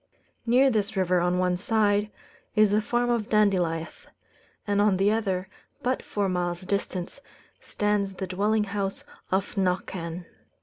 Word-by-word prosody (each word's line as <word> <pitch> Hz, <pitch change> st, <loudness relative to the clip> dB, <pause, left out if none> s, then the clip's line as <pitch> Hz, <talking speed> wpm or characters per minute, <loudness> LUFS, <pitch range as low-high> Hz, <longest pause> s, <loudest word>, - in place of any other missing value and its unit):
Near 260 Hz, +3 st, +5 dB
this 215 Hz, -2 st, -1 dB
river, 180 Hz, -1 st, +2 dB
on 180 Hz, +1 st, +1 dB
one 180 Hz, -1 st, +1 dB
side, 205 Hz, +1 st, +1 dB, 0.5 s
is 215 Hz, -2 st, +5 dB
the 210 Hz, +1 st, +3 dB
farm 240 Hz, +2 st, 0 dB
of 230 Hz, -3 st, -1 dB
Dandilieth; 180 Hz, -6 st, +1 dB, 0.6 s
and 205 Hz, -1 st, +1 dB
on 205 Hz, -2 st, +3 dB
the 195 Hz, +2 st, +3 dB
other, 195 Hz, -4 st, -1 dB, 0.4 s
but 255 Hz, +1 st, 0 dB
four 205 Hz, -1 st, -2 dB
miles 175 Hz, -1 st, -1 dB
distant, 185 Hz, +2 st, -3 dB, 0.4 s
stands 205 Hz, -2 st, -1 dB
the 190 Hz, -, -4 dB
dwelling 205 Hz, +4 st, +1 dB
house 200 Hz, -1 st, -3 dB, 0.3 s
of 190 Hz, +2 st, 0 dB
Knockan. 180 Hz, -2 st, -2 dB
200 Hz, 140 wpm, -26 LUFS, 185-210 Hz, 0.6 s, Near